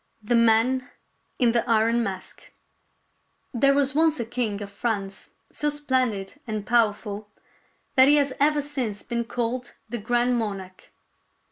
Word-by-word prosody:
THE 220 - 0
MAN 235 +3 +3 0.5
IN 240 -2 +3
THE 235 0 +1
IRON 230 +1 +3
MASK 195 -4 -6 1.0
There 275 +3 +3
was 280 -1 +2
once 315 0 +3
a 235 - -2
king 225 -3 -2
of 200 - -9
France 200 -2 -3 0.2
so 295 - 0
splendid 260 -6 -1
and 215 -2 -3
powerful 210 -3 0 0.6
that 260 0 +6
he 290 - +6
has 285 -2 +2
ever 295 +1 +3
since 255 -8 -3
been 235 -1 -2
called 245 +1 -3
the 240 +1 -4
Grand 240 +3 +1
Monarch. 195 -4 -6
235 Hz, 140 wpm, -25 LUFS, 215-260 Hz, 1.0 s, that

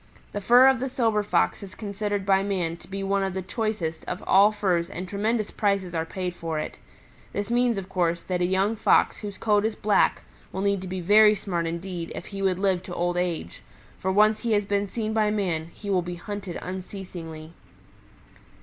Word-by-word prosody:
The 205 - -4
fur 245 +6 +7
of 265 -2 +4
the 265 +2 -2
Silver 225 -4 +1
Fox 205 - +1
is 195 -2 -10
considered 205 -1 -3
by 195 -1 +4
man 185 -4 -1
to - - -15
be 195 +1 -4
one 195 0 +1
of 190 -1 -2
the 190 - -2
choicest 185 -5 -2
of 180 - -5
all 200 +2 +6
furs 180 -5 0
and 180 +2 -6
tremendous 215 +3 -1
prices 200 -4 0
are 165 -1 -1
paid 180 -1 -3
for 165 -2 -4
it. 155 - -5 0.5
This 205 +2 -3
means, 240 -2 +2
of 190 -1 -4
course, 170 -3 0
that 180 -1 -2
a - - +3
young 190 +4 +1
Fox - - +3
whose 205 -2 -7
coat 210 -2 +2
is 220 0 0
black 210 -1 +2 0.3
will 190 - -3
need 200 -1 +1
to 190 - -6
be 185 0 -4
very 210 +4 +6
smart 175 -4 -2
indeed 170 0 -5
if - - -6
he 195 -1 -6
would 190 -2 +2
live 190 -2 +1
to 180 -1 -8
old 175 +1 0
age, 175 - -2 0.4
for 190 - 0
once 215 +2 +4
he 235 -2 0
has 205 -1 +2
been 200 0 0
seen 220 +2 -3
by 215 -1 +2
man 175 -6 -1
he 205 +2 -6
will 185 -2 +3
be 175 0 -5
hunted 195 0 -6
unceasingly." 180 -4 -7
195 Hz, 210 wpm, -26 LUFS, 180-210 Hz, 0.5 s, fur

